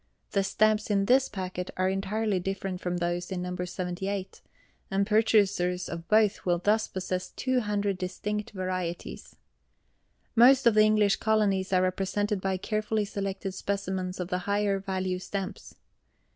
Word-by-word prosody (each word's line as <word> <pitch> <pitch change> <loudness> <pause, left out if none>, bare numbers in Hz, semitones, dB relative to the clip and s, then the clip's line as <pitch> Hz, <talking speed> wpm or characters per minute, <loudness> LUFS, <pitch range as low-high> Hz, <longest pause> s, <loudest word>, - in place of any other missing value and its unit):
The 200 -2 +2
stamps 215 +2 +2
in 200 -1 +2
this 260 +4 +4
packet 185 -2 -5
are 185 0 +2
entirely 195 +1 0
different 195 0 -4
from 180 0 -2
those 175 0 -2
in 180 -1 -2
No. 180 0 -4
78, 185 +2 -4 0.5
and 200 -1 +1
purchasers 200 -4 +2
of 170 0 -6
both 215 0 +3
will 175 -1 +2
thus 210 +5 +2
possess 185 -1 -3
two 260 -1 0
hundred 205 -3 -1
distinct 210 +3 -3
varieties. 185 - -4 1.0
Most 255 +3 +6
of 235 - +6
the 215 - +6
English 215 -2 +3
Colonies 205 -4 +1
are 185 -1 +3
represented 195 +2 -1
by 190 -1 0
carefully 215 +2 -1
selected 195 -1 -4
specimens 190 -2 -3
of 180 -1 -3
the 180 - 0
higher 200 +1 0
value 190 -1 -2
stamps. 195 +1 -6
195 Hz, 145 wpm, -28 LUFS, 185-210 Hz, 1.0 s, Most